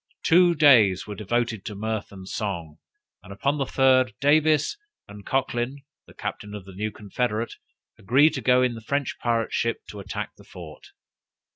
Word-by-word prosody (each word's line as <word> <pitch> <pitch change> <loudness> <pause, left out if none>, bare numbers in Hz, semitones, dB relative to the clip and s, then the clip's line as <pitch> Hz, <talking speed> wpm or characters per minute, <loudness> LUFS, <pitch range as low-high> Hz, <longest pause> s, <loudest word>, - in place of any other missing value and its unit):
Two 175 +1 +5
days 120 - +5
were 105 - -6
devoted 115 0 -2
to 105 -3 -6
mirth 110 +1 -4
and 95 -2 -11
song, 85 -9 -4 0.4
and 95 - -13
upon 140 +9 -1
the 135 - -1
third, 130 -4 +3
Davis 150 +1 +3 0.3
and 100 0 -12
Cochlyn, 130 +1 -1 0.2
the - - -17
captain 105 0 -6
of 100 -3 -9
the 95 - -12
new 105 +3 -3
confederate, 110 +2 -3 0.5
agreed 140 +9 +4
to 135 - -3
go 125 0 +4
in 125 -1 +1
the 115 - -9
French 140 +3 -2
pirate 115 -2 -1
ship 115 0 -1
to 105 - -8
attack 100 - -5
the - - -16
fort. 80 -4 -12
115 Hz, 170 wpm, -25 LUFS, 100-135 Hz, 0.5 s, Two